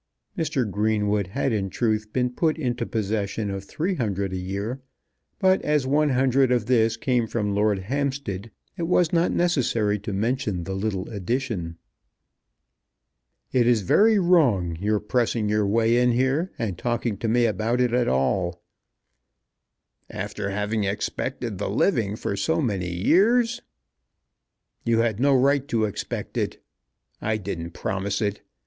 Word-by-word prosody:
Mr. 150 - -1
Greenwood 105 -1 0
had 130 +5 -1
in 100 -3 -1
truth 110 0 -1
been 125 +1 0
put 155 +5 0
into 125 -5 -2
possession 105 -1 -2
of 100 0 -4
three 165 - -2
hundred 100 - -2
a - - -2
year; 100 +8 -4 0.6
but 190 -2 +3
as 150 -3 +1
one 150 +3 +2
hundred 130 0 +3
of 120 -4 +2
this 115 -2 +2
came 120 -1 +1
from 105 -3 -1
Lord 105 0 +2
Hampstead 125 -2 -3 0.3
it 170 -2 -2
was 175 -1 +2
not 170 0 +3
necessary 120 -11 +1
to 105 +2 -5
mention 105 -2 -1
the 95 - -4
little 95 -1 -2
addition. 100 -5 -3 1.7
"It 120 -2 +3
is 115 -4 +3
very 215 - +4
wrong, 135 - +3
your 105 +4 0
pressing 115 0 0
your 105 -1 +1
way 115 +3 +3
in 125 0 +3
here 135 +9 +1
and 100 -6 -3
talking 120 -2 -1
to 115 - -3
me 120 +2 +3
about 110 +3 0
it 125 -1 +2
at 125 -1 +2
all." 85 +7 0 1.5
"After 105 +1 -4
having 105 +2 -1
expected 105 +2 -3
the 100 - -2
living 105 - +1
for 100 - -3
so 160 +11 0
many 100 - -1
years!" 230 - +3 1.2
"You 115 -1 +2
had 115 -2 0
no 140 +1 +4
right 140 +1 +2
to 115 -6 +1
expect 105 - -5
it. - - -2 0.6
I 110 0 0
didn't 85 -4 -5
promise 95 +1 -2
it. 105 -1 -2
110 Hz, 150 wpm, -24 LUFS, 100-130 Hz, 1.7 s, very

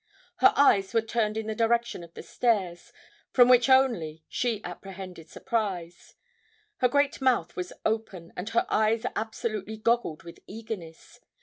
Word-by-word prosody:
Her 390 - +6
eyes 210 -7 +4
were 225 - +3
turned 220 -1 -1
in 220 - -3
the 220 - -2
direction 235 -3 0
of 170 -1 -15
the - - -8
stairs, 195 -8 -1 0.4
from 245 -1 +7
which 250 +1 +5
only 210 -13 +2
she 235 -4 -1
apprehended 180 -2 -9
surprise. 185 -7 -4 0.6
Her 250 - +3
great 285 +2 +1
mouth 240 -11 +1
was 180 0 -4
open, 215 -6 -3
and 180 +4 -5
her 230 - +1
eyes 220 +2 +1
absolutely 220 -1 -4
goggled 230 -8 0
with 170 0 -12
eagerness. 205 -7 -9
220 Hz, 145 wpm, -27 LUFS, 180-235 Hz, 0.6 s, from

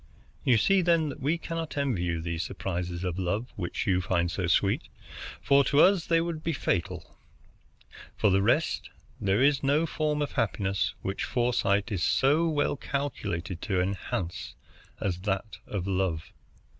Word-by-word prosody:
You 120 -3 +4
see, 195 - +4
then, 165 -3 +2
that 140 - -7
we 150 +5 +1
cannot 165 -2 -5
envy 135 -10 0
you 85 -2 -1
these 85 0 -3
surprises 90 -1 -4
of 90 0 -2
love 100 +7 -2
which 85 -4 -3
you 90 -2 +2
find 85 -2 0
so 90 0 -2
sweet, 95 +3 +2 0.5
for 140 +9 +4
to 145 - +2
us 185 -3 +4
they 165 -1 +4
would 165 -2 -3
be 165 - 0
fatal. 90 - -2 1.0
For 105 - +3
the 95 +1 +3
rest, 120 +10 +1 0.3
there 100 +5 +2
is 140 0 +4
no 145 +4 +2
form 150 -2 -1
of 145 - -4
happiness 100 - 0
which 95 +1 -2
foresight 120 -3 +1
is 95 -5 -1
so 145 - +3
well 145 -2 +1
calculated 95 -12 -3
to 95 -4 0
enhance 90 -1 -3 0.4
as 90 -3 -2
that 100 +2 -3
of 95 -4 -3
love. 95 -4 -1
105 Hz, 160 wpm, -28 LUFS, 90-145 Hz, 1.0 s, You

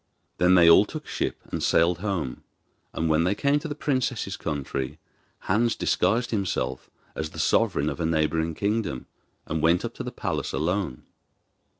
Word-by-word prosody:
Then 90 +1 +5
they 85 -2 +7
all 85 - +8
took - - -7
ship - - -3
and - - -2
sailed 85 +1 +3
home, 90 -10 -3 0.5
and 80 - -1
when 80 +1 +3
they 90 +4 +1
came 140 +4 +2
to 155 - -6
the 145 - -4
princess's 130 -9 -1
country, 70 -1 -4 0.4
Hans 115 +1 +1
disguised 115 +2 +1
himself 100 -5 -2 0.2
as 80 0 -4
the - - -13
sovereign 70 - +2
of 75 - -3
a 85 - 0
neighbouring 80 0 0
kingdom, 100 - -1 0.4
and 80 -1 -2
went 85 +3 +3
up - - -5
to - - -6
the - - -5
palace - - -3
alone. 85 -4 -1
85 Hz, 170 wpm, -26 LUFS, 80-105 Hz, 0.5 s, all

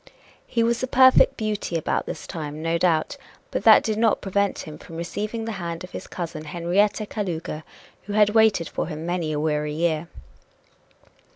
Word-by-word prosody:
He 230 -1 +1
was 235 +1 +1
a 255 - -1
perfect 260 0 +6
beauty 210 -6 -2
about 160 - -1
this - - -6
time, 150 -2 -6
no 165 +1 0
doubt, 170 - +1 0.3
but - - -2
that - - +8
did 215 -1 -1
not 225 -1 +3
prevent 200 0 0
him 155 -1 -9
from 165 - -11
receiving 210 +7 -4
the 225 - -3
hand 170 0 -4
of 180 - -10
his - - -7
cousin 165 -3 -6
Henrietta 180 +7 +1
Kalouga, 175 -7 -4 0.4
who 205 - -5
had 210 0 +4
waited 220 -6 +4
for - - -3
him 155 -1 -6
many 175 -2 -1
a 150 - -1
weary 150 -1 -1
year. 160 0 0
175 Hz, 180 wpm, -24 LUFS, 160-215 Hz, 0.4 s, that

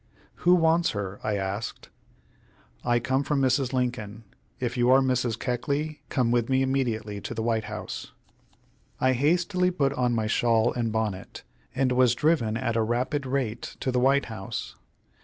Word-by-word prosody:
"Who 180 +1 +5
wants 165 0 +3
her?" 100 -1 -4
I 110 -1 0
asked. 100 +3 -4 0.9
"I 120 -1 +2
come 130 +3 0
from 140 0 0
Mrs. 130 -1 +2
Lincoln. 120 -4 -2 0.4
If 120 -1 -2
you 120 0 +2
are 130 +1 +7
Mrs. 125 -3 0
Keckley, 140 +5 -2
come 125 -4 +1
with 120 0 +1
me 130 0 +3
immediately 115 -6 -1
to 120 - -6
the 110 - -2
White 115 -2 0
House." - - -6 0.9
I 130 0 +3
hastily 175 +7 +2
put 140 -6 0
on 125 -3 +1
my 110 -1 0
shawl 115 0 +2
and 115 -2 -1
bonnet, 105 -4 -3 0.3
and 130 -1 +2
was 125 -1 +4
driven 145 -9 +1
at 115 0 -1
a 115 - +2
rapid 125 +5 -1
rate 130 -4 -3
to 130 - 0
the 125 - +1
White 135 +2 +3
House. 110 -4 -6
125 Hz, 165 wpm, -26 LUFS, 115-135 Hz, 0.9 s, are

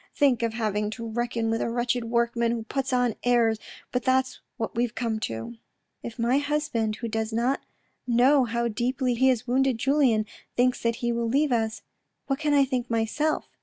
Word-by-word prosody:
Think 270 -5 +3
of 230 -1 -1
having 210 -2 -1
to 230 -1 -5
reckon 230 0 -1
with 225 - 0
a - - -1
wretched 240 0 -1
workman 235 0 +1
who 230 -1 -3
puts 270 +4 -3
on 245 -2 +2
airs, 235 -3 +3 0.3
but 250 - 0
that's 260 +1 +1 0.2
what 225 - -3
we've 240 0 -1
come 225 -2 -1
to." 115 - -6 0.2
" - - -52
If 235 - -7
my 240 +3 +2
husband, 285 -7 -1
who 230 +1 -5
does 220 0 -2
not 240 +5 0 0.5
know 250 +3 +4
how 235 +1 -1
deeply 250 +3 0
he 260 +3 +3
has 245 -2 +2
wounded 260 0 +2
Julien, 255 -4 +2 0.3
thinks 250 +1 +2
that 230 0 +1
he 240 - +2
will 235 -1 -1
leave 285 +3 +2
us, 220 -2 -1 0.4
what 270 -1 -1
can 300 -2 +1
I 280 -1 +5
think 255 -2 -2
myself?" 235 +7 0
240 Hz, 195 wpm, -26 LUFS, 225-260 Hz, 0.5 s, I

